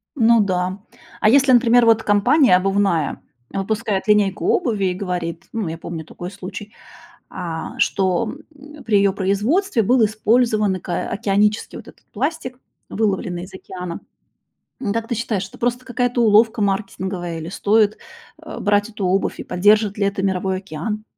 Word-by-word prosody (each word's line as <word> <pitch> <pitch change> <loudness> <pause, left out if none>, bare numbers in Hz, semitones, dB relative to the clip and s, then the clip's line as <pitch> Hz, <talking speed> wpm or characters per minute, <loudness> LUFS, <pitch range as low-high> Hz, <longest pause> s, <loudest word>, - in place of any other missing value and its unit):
Ну 235 -3 +4
да. 185 -1 -1 0.4
А 215 - +5
если, 270 +2 +5
например 240 -1 +5
вот, 225 -1 +4
компания 210 - +4
обувная 195 -5 0 0.3
выпускает 205 +1 -2
линейку 205 -2 +2
обуви 220 - +1
и 185 - +1
говорит, 180 -3 -4
ну 225 -5 -2
я 160 +1 -5
помню 165 -1 -7
такой 175 +2 -8
случай, 200 +2 -9 0.6
а, 165 -3 -6
что, 190 +3 +1 0.2
м, 295 +1 -14
при 215 -3 +2
ее 200 -1 +3
производстве 225 - +1
был 240 +3 +3
использован 215 -2 +1
ак 180 - -11
океанический 210 +3 0
вот - - -12
этот - - -17
пластик, 255 0 -3 0.3
выловленный 190 -5 -1
из 190 +1 -14
океана. 180 -2 -7 0.8
М, 205 -6 -2
как 230 0 -2
ты - - -2
считаешь, 210 -4 -2
это - - -16
просто 245 +1 -1
какая-то 245 -1 0
уловка 220 +1 +4
маркетинговая 190 -3 -2
или 160 +1 -6
стоит, 210 +2 +2 0.5
э, - - -8
брать 205 +1 +1
эту 210 -3 -4
обувь, 190 +2 0
и - - -4
поддержит 205 +3 +2
ли 205 - +1
это 195 -1 -2
мировой 190 0 0
океан? 195 +4 -5
205 Hz, 155 wpm, -20 LUFS, 190-225 Hz, 0.8 s, А